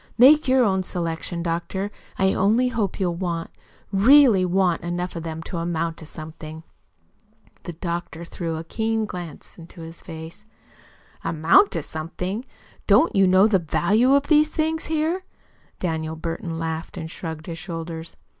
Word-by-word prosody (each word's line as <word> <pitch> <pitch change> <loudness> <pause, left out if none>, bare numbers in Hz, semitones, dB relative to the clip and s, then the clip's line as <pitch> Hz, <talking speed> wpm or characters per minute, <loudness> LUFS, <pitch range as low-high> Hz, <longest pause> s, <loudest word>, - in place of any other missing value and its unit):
Make 275 +5 +7
your 260 0 +5
own 190 -4 +2
selection, 170 -1 -3
doctor. 175 +4 -2 0.3
I 190 0 +3
only 225 +6 +3
hope 220 -6 -2
you'll 180 -3 +1
want 170 -2 -3 0.4
really 230 0 +6
WANT 180 -1 +2
enough 175 +1 -3
of 165 - -4
them 160 0 -5
to 175 - -5
amount 165 -1 -2
to 160 - -10
something." 155 0 -8 1.0
The 175 - -5
doctor 170 0 -5
threw 165 -1 -4
a 160 - -5
keen 220 +5 -1
glance 175 -4 -8
into 170 +1 -12
his 165 +1 -9
face. 160 +4 -9 0.8
"Amount 165 - +4
to - - -2
something! 180 +8 -4 0.4
Don't 330 - +5
you 195 -1 +5
know 185 +2 +6
the 200 -4 +3
value 220 - +3
of 280 - +3
these 305 0 +4
things 320 +1 -1
here?" 320 +4 0 0.6
Daniel 160 -2 -2
Burton 165 0 -4
laughed 160 +1 -4
and 160 -2 -6
shrugged 160 -3 -6
his 165 -1 -6
shoulders. 165 -2 -6
175 Hz, 155 wpm, -23 LUFS, 165-210 Hz, 1.0 s, Make